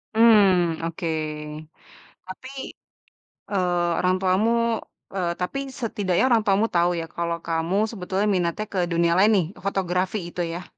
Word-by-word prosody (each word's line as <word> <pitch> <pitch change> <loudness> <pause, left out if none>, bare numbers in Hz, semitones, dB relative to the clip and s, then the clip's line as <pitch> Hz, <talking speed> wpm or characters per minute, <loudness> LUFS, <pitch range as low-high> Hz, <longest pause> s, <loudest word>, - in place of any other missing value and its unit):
Mmm, 195 -7 +5
oke, 165 +1 -4 1.2
tapi, 190 +8 -9 1.0
eee, 175 -3 +1
orang 185 0 +2
tuamu, 190 +5 +2 0.6
eee, 175 -2 0
tapi 180 +10 -2 0.2
setidaknya 205 -4 0
orang 230 -2 +5
tuamu 200 +2 +3
tahu 175 +1 +3
ya 165 - -4
kalau 170 0 -1
kamu 165 +3 -1 0.2
sebetulnya 195 0 -2
minatnya 180 +4 -1
ke 185 - 0
dunia 170 0 +2
lain 210 +3 +5
nih 180 -5 +2 0.2
fotografi 185 +1 0
itu 175 - -4
ya? 175 +2 -5
185 Hz, 135 wpm, -24 LUFS, 170-200 Hz, 1.2 s, Mmm